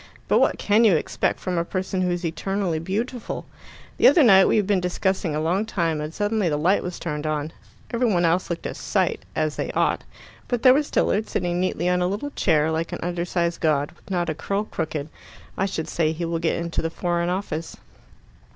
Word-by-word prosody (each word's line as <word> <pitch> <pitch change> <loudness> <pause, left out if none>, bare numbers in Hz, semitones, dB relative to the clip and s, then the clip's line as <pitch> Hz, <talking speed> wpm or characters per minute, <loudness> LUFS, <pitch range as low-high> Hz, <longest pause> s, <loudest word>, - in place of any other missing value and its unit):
"But - - +4
what - - +3
can 210 +3 +3
you 210 -6 +6
expect 155 - -1
from 180 -2 -1
a - - +1
person 185 +1 -2
who's 175 -1 -1
eternally 175 +1 -1
beautiful? 220 +8 -3 0.5
The - - +6
other 325 - +6
night 195 -5 +7
we - - +3
had 210 - +2
been 200 -1 +2
discussing 180 -2 -1
a - - 0
long 175 +6 +1
time, 165 -8 -1
and 150 +1 -4
suddenly 205 0 0
the 150 - 0
light 180 +7 +2
was 180 -1 -5
turned 150 -2 -4
on. 155 0 -2 0.4
Every 235 -1 +2
one 175 -2 +2
else 170 +3 +1
looked 170 -1 -4
a - - -3
sight, - - -1
as 155 -1 -1
they - - -2
ought. - - +1 0.4
But 245 -2 -2
there 255 - +8
was 290 +2 +1
Tilliard, 215 +1 +1
sitting 175 0 -1
neatly 180 -1 0
on 180 0 +2
a 180 - +2
little 205 +10 -3
chair, 160 - +2
like 160 +1 -2
an - - -4
undersized 175 0 -1
god, 145 -3 +1
with - - -21
not 175 -2 0
a 160 - 0
curl 200 +6 -2
crooked. 155 -7 -4 0.5
I 195 - 0
should 160 -4 -4
say 160 -2 +1
he 170 +2 -3
will 165 0 -2
get 165 0 0
into 170 0 -2
the 165 - -1
Foreign 175 +1 -1
Office." 180 -4 -3
175 Hz, 215 wpm, -24 LUFS, 165-195 Hz, 0.5 s, there